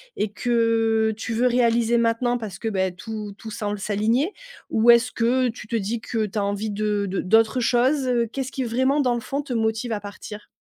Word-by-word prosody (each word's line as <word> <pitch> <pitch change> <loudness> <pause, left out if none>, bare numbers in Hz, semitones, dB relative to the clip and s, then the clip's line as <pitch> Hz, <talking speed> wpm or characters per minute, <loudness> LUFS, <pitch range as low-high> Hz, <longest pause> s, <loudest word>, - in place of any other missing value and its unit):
et 210 -1 -2
que 225 -1 +1
tu 225 +1 -4
veux 245 +3 +2
réaliser 235 -1 +2
maintenant 235 +1 +1
parce 205 -5 -7
que, 225 - -2
beh, 190 -3 -1
tout 210 0 -6
tout 220 -1 -9
semble 205 -1 -3
s'aligner 225 - 0 0.4
ou 230 +2 +5
est-ce 235 +1 +4
que 245 +2 +1
tu 225 -1 -9
te 230 - -3
dis 225 +2 -1
que 220 -1 -2
tu 205 +2 -3
as - - 0
envie 205 +2 -2
de 205 -1 -1
de 190 - -2
d'autres 225 +5 +3
choses? 255 +3 +2 0.2
Qu'est-ce 270 -1 -4
qui 265 - -2
vraiment 260 +5 +1
dans 250 -2 +1
le 235 - -3
fond, 280 +5 -3
te 280 -3 -10
motive 225 +1 -1
à 210 - -1
partir? 205 +1 -9
225 Hz, 210 wpm, -23 LUFS, 210-245 Hz, 0.4 s, ou